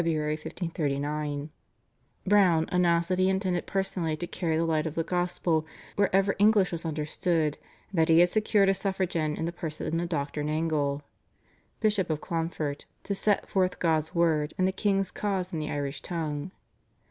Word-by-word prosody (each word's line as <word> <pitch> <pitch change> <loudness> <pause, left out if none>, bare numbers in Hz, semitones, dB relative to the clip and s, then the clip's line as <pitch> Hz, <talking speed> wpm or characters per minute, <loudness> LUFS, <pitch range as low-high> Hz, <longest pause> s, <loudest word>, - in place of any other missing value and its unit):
1539) 150 -2 -2 0.7
Browne 185 -5 +4
announced 170 -2 +3
that 185 0 +1
he 185 0 +4
intended 190 -2 0
personally 180 -5 -1
to 175 - -3
carry 165 -2 -1
the 165 - +1
light 160 -1 +1
of 155 - -5
the 165 - 0
gospel 175 -2 0 0.3
wherever 195 0 +2
English 205 -2 +4
was 165 -1 -4
understood, 155 0 -1 0.3
and 185 - -1
that 160 - +3
he 165 - +6
had 175 +1 +7
secured 210 0 +2
a 195 - +5
suffragan 185 -6 -1
in 160 - -2
the 170 - -2
person 165 -1 -3
of 170 0 -2
Dr. 145 -2 -2
Nangle, 150 -2 0 0.8
Bishop 210 -5 +2
of 155 -2 0
Clonfert, 160 -4 -3 0.2
to 200 - -2
set 205 +1 +1
forth 185 -2 +1
God's 160 0 0
Word 160 -3 +2
and 185 - +3
the - - +1
king's 195 0 0
cause 190 -3 -2
in 160 - -1
the 155 - -3
Irish 140 -1 -3
tongue. 155 -2 -3
165 Hz, 165 wpm, -28 LUFS, 155-185 Hz, 0.8 s, had